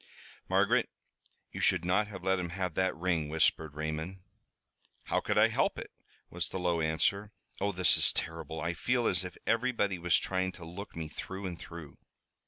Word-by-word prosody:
"Margaret, - - +3 0.6
you - - -6
should 85 - +3
not 100 +4 +2
have 95 -4 -9
let 95 0 +2
him 90 -1 -3
have 90 0 -3
that 95 +3 +1
ring," 85 -3 0
whispered 80 -1 +2
Raymond. 80 +5 -4 0.8
"How - - 0
could - - -1
I - - +6
help - - +1
it?" - - -7 0.4
was 85 -1 -2
the - - -4
low 90 -2 +1
answer. 100 +6 +1 0.3
"Oh, 100 +1 +1
this 95 -1 +4
is - - +6
terrible! 80 0 -3
I 85 +2 -1
feel 120 +8 0
as 90 -3 +2
if 90 -1 -8
everybody 115 -5 +1
was 85 0 +4
trying 95 0 0
to 85 - -10
look 90 +5 -8
me 80 -1 -4
through 95 +5 -7
and 90 -2 -5
through!" 80 -4 -10
90 Hz, 185 wpm, -31 LUFS, 80-95 Hz, 0.8 s, I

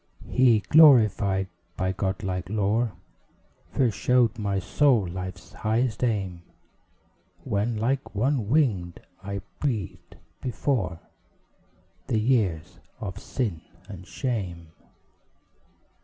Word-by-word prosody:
He, 120 -4 +4
glorified 110 -10 +5 0.3
by 95 0 0
god 95 +1 -2
like 90 -1 -3
lore, 110 +2 0 0.8
First 120 -6 0
showed 125 -3 +3
my 100 -2 -1
soul 120 0 +2
Life's 90 +1 -7
highest 115 +2 -1
aim; 95 -7 -1 1.0
When, 110 +1 -1
like 130 +2 -1
one 120 -1 0
winged, 110 - +1 0.2
I 100 0 -4 0.2
breathed 115 - -3 0.3
before 120 - -1 1.1
The 120 -4 +1
years 105 -9 0 0.2
of 100 -2 -6
sin 105 -12 -3 0.3
and 90 -3 -10
shame. 90 - -4
105 Hz, 95 wpm, -26 LUFS, 95-125 Hz, 1.1 s, glorified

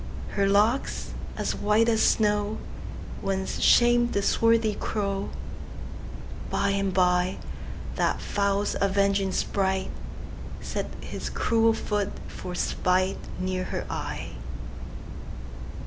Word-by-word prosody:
Her 200 -1 +2
locks, 210 +6 +2 0.3
as - - 0
white 210 +2 +3
as 225 -1 +3
snow, 210 -1 +3 0.6
Once 190 0 -1
sham'd 240 0 +5
the 200 - +1
swarthy 230 0 +4
crow:By 200 0 -4
and 195 -1 +1
byThat 180 0 0
fowl's 200 0 +1
avenging 200 0 +3
spriteSet 190 0 -3
his - - -4
cruel 225 -1 +3
foot 210 -2 -1 0.2
for 180 - -6
spiteNear 185 0 0
her - - -3
eye. - - -3
200 Hz, 85 wpm, -27 LUFS, 190-215 Hz, 0.6 s, sham'd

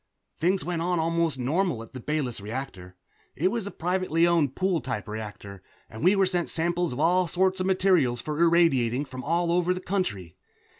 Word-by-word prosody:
Things 185 +3 +1
went 175 -2 -2
on 175 0 0
almost 165 -2 0
normally 145 0 0
at - - -23
the 130 - -6
Bayless 135 -5 -3
reactor. 100 -5 -7 0.4
It 175 +7 +1
was 225 -3 -2
a - - -3
privately 180 -2 0
owned 165 -6 +2
pool 185 -4 0
type 120 -6 -4
reactor, 105 -2 -7 0.3
and 110 - -8
we 185 +4 +5
were 195 -1 +3
sent 180 -2 -1
samples 175 +1 0
of 125 - -5
all 175 +3 +3
sorts 190 +3 +1
of 185 - -1
material 185 -9 +3
for 150 +5 -4
irradiation 145 -7 +3
from 130 -1 -8
all 170 +3 0
over 180 +1 +2
the - - -4
country. 115 - -3
165 Hz, 190 wpm, -26 LUFS, 125-180 Hz, 0.4 s, we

